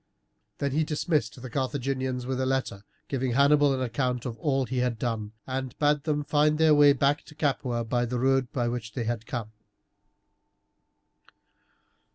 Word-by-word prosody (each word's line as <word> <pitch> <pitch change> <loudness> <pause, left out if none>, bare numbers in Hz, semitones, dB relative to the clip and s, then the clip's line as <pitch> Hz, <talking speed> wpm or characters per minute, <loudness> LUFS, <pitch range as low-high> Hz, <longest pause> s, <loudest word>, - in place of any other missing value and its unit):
Then 140 -1 -1
he 155 +4 +1
dismissed 150 -6 -1
the 130 +1 -8
Carthaginians, 130 -2 -2
with 130 0 -2
a - - +1
letter 130 -7 -2 0.2
giving 130 -2 -1
Hannibal 145 +2 +5
an 130 -1 -1
account 125 0 -1
of 120 -3 -4
all 135 -1 +1
he 125 +2 -2
had 125 -2 0
done, 110 -2 -3
and 130 -1 -4
bade 150 -1 +2
them 150 -2 0
find 150 +1 +2
their 160 -1 +5
way 145 -1 +7
back 140 +1 +2
to 150 - -14
Capua 130 -5 -1
by 120 +1 0
the 125 +1 -2
road 130 0 +1
by 120 -2 -1
which 120 -2 -4
they 120 - -2
had 115 -1 -3
come. 115 -4 -4
130 Hz, 170 wpm, -27 LUFS, 120-145 Hz, 0.2 s, way